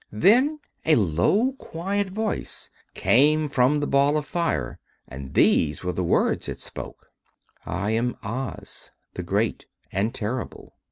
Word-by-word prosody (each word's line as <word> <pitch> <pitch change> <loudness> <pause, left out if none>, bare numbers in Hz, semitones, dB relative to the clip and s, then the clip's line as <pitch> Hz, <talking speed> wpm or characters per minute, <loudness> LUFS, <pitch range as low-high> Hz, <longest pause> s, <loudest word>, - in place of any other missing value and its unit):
Then 250 - +4 0.2
a 155 - +5
low, 110 - +2
quiet 195 +4 -2
voice 215 +3 -3 0.2
came 150 +5 +4
from 140 +1 +2
the 145 - -1
Ball 140 +2 +3
of 150 - -2
Fire, 170 0 -2 0.3
and 65 0 -9
these 75 0 +3
were 90 - -1
the 90 - -2
words 85 - +1
it - - -6
spoke: - - -8 0.6
"I 100 +4 -1
am 115 +2 0
Oz, 120 +3 -6 0.2
the - - -4
Great - - -1 0.2
and 100 +4 0
Terrible. 115 +3 -4
140 Hz, 135 wpm, -24 LUFS, 105-170 Hz, 0.6 s, a